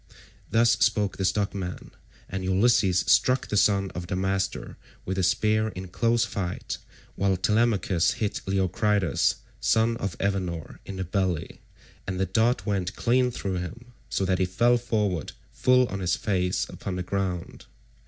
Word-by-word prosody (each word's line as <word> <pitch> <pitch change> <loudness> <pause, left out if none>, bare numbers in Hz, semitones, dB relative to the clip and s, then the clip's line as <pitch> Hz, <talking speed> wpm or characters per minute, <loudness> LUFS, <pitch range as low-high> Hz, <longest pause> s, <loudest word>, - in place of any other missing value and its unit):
Thus 115 +1 +4
spoke 105 -3 +2
the 95 - -1
stockman, 100 -2 -2 0.4
and 95 -1 -4
Ulysses 95 -1 +3
struck 125 +3 +3
the - - -1
son 100 -1 +3
of 90 -1 -6
Damastor 95 +1 -2 0.3
with 95 +1 -2
a - - +3
spear 110 +4 +2
in 95 -3 -7
close 115 +4 +2
fight, 95 -4 -4 0.4
while 95 -1 +1
Telemachus 105 -3 +2
hit 105 -2 -2
Leocritus 95 -1 +1 0.2
son 115 +1 +2
of 100 -4 -4
Evenor 90 -6 -2
in 100 - -6
the 95 - -3
belly, 95 -2 -2 0.5
and 95 -1 -3
the 95 - +2
dart 110 +7 +1
went 100 -2 -1
clean 125 +1 +2
through 95 -6 -3
him, 120 +8 -7 0.2
so 95 - 0
that 95 -1 +1
he 95 - +3
fell 120 +7 +3
forward 105 -8 -1 0.2
full 125 0 +4
on 95 - -4
his 90 -1 +1
face 90 -3 0
upon 95 - -6
the 90 - -3
ground. 90 -2 -3
95 Hz, 155 wpm, -26 LUFS, 90-110 Hz, 0.5 s, Thus